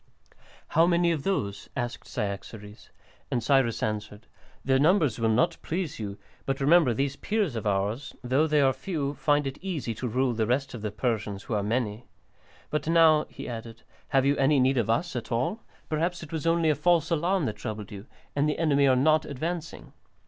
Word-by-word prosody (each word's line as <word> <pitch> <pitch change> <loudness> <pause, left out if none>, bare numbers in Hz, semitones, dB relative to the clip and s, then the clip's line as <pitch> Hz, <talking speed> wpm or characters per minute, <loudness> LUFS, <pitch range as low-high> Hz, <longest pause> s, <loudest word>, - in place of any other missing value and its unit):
"How 165 +2 +4
many 170 -1 +3
of 160 -4 -1
those?" 105 - -2
asked 120 -1 -4
Cyaxares. 105 +1 -6 0.4
And 120 - -1
Cyrus 130 -2 +2
answered, 105 0 -4 0.4
"Their 130 -1 +3
numbers 150 - +3
will 115 -1 +2
not 110 +3 +2
please 165 -4 -3
you, 100 -2 -5 0.3
but 135 0 -1
remember 150 0 +5
these 135 +4 -1
Peers 205 - -1
of 110 -2 -3
ours, 100 +6 -1
though 135 +6 +2
they 150 -1 +3
are 135 -1 +4
few, 140 0 -3
find 145 +1 +1
it 135 0 -5
easy 155 -12 -3
to 125 +4 -4
rule 125 +2 +1
the 110 -1 0
rest 135 +3 0
of 120 - -7
the 105 - -2
Persians, 105 -2 -2
who - - -5
are 105 - +1
many. 110 +1 -2 0.6
But 150 0 -2
now," 160 -2 +5
he - - -8
added, 115 -1 -7 0.2
"have 135 -2 +2
you 140 +1 +3
any 140 +1 +3
need 130 0 +3
of 110 - -1
us 165 +7 0
at 120 0 -5
all? 165 - -1 0.3
Perhaps 170 +3 -1
it 155 - -10
was 160 0 -3
only 165 -1 +3
a - - +1
false 170 +2 +2
alarm 170 +1 +1
that 110 - -3
troubled 105 -1 -6
you, 100 +3 -9 0.3
and 145 +1 +2
the 150 - -1
enemy 145 -4 +3
are 130 - +5
not 155 +4 +3
advancing?" 165 +4 -5
135 Hz, 195 wpm, -27 LUFS, 115-155 Hz, 0.6 s, remember